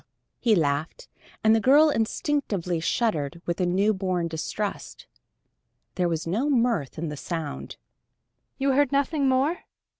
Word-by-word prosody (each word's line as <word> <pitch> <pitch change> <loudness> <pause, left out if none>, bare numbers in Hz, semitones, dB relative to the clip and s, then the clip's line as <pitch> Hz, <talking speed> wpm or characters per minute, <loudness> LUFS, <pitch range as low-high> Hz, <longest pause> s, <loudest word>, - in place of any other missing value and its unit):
He 225 -3 +3
laughed, 155 - -1 0.4
and 220 0 +5
the 225 - +4
girl 290 +7 +5
instinctively 220 - -1
shuddered 165 - -1
with 170 +1 -2
a 180 - +2
newborn 185 -2 +1
distrust. 195 +6 -5 0.9
There 180 -2 0
was 165 -1 -2
no 220 - 0
mirth 235 - +1
in 165 0 -3
the 150 - -5
sound. 160 -1 -5 0.8
"You 275 0 +1
heard 280 0 +2
nothing 280 0 +1
more? 275 +7 +1
205 Hz, 130 wpm, -25 LUFS, 170-265 Hz, 0.9 s, and